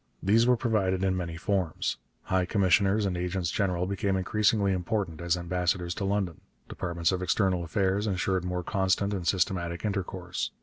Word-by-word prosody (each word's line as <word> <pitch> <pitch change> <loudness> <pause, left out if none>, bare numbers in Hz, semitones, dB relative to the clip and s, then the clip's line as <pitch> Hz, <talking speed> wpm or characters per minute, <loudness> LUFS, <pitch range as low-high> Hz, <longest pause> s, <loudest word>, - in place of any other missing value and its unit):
These 115 +5 +4
were 125 -1 +4
provided 100 -6 +1
in 95 -1 +2
many 85 -2 -4
forms. 90 -2 -1 0.3
High 95 -1 +1
commissioners 100 +2 +3
and 95 -2 -1
agents 90 -1 -2
general 90 -3 0
became 95 0 0
increasingly 100 +1 +2
important 90 -2 -2
as 85 0 +1
ambassadors 90 0 -1
to 100 - -3
London. 95 -4 -1 0.3
Departments 85 -1 -1
of 95 -1 -1
External 90 0 +1
Affairs 95 +5 0
ensured 95 -1 0
more 90 0 -2
constant 95 +2 +1
and 90 -4 -3
systematic 85 -1 0
intercourse. 95 -3 -3
95 Hz, 160 wpm, -28 LUFS, 90-100 Hz, 0.3 s, These